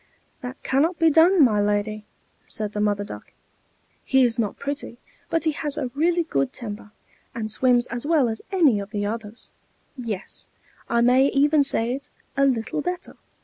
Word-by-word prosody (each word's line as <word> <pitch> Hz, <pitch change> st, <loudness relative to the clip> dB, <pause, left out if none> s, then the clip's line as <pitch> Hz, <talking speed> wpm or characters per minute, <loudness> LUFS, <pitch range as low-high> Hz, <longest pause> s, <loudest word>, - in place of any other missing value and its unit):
"That 250 Hz, +1 st, -8 dB
cannot 315 Hz, +6 st, +1 dB
be 325 Hz, -1 st, +4 dB
done, 330 Hz, +2 st, +6 dB
my 210 Hz, -4 st, +2 dB
lady," 210 Hz, +1 st, -1 dB, 0.4 s
said 215 Hz, -1 st, -3 dB
the 210 Hz, -, -3 dB
Mother 205 Hz, -1 st, +1 dB
Duck. -, -, -10 dB, 0.7 s
"He 265 Hz, -1 st, +3 dB
is 235 Hz, -1 st, +1 dB
not 215 Hz, -3 st, -1 dB
pretty, 280 Hz, -4 st, -5 dB, 0.3 s
but 330 Hz, -, 0 dB
he 315 Hz, -, +2 dB
has 295 Hz, 0 st, -2 dB
a 250 Hz, -, -3 dB
really 340 Hz, +4 st, +2 dB
good 135 Hz, -, -1 dB
temper, 210 Hz, -3 st, -7 dB, 0.5 s
and 220 Hz, -2 st, -3 dB
swims 245 Hz, +1 st, +3 dB
as 240 Hz, 0 st, -5 dB
well 300 Hz, -4 st, +3 dB
as 220 Hz, -1 st, -4 dB
any 310 Hz, -, +4 dB
of 200 Hz, 0 st, -6 dB
the 205 Hz, -2 st, -3 dB
others; 220 Hz, +1 st, -6 dB, 0.4 s
yes, 225 Hz, -7 st, -6 dB, 0.4 s
I 235 Hz, 0 st, +2 dB
may 255 Hz, +3 st, +5 dB
even 290 Hz, +2 st, +3 dB
say 240 Hz, -3 st, +1 dB
it, 275 Hz, +2 st, -7 dB, 0.3 s
a 275 Hz, 0 st, +3 dB
little 245 Hz, +2 st, -1 dB
better. 360 Hz, +2 st, -5 dB
250 Hz, 175 wpm, -24 LUFS, 215-290 Hz, 0.7 s, done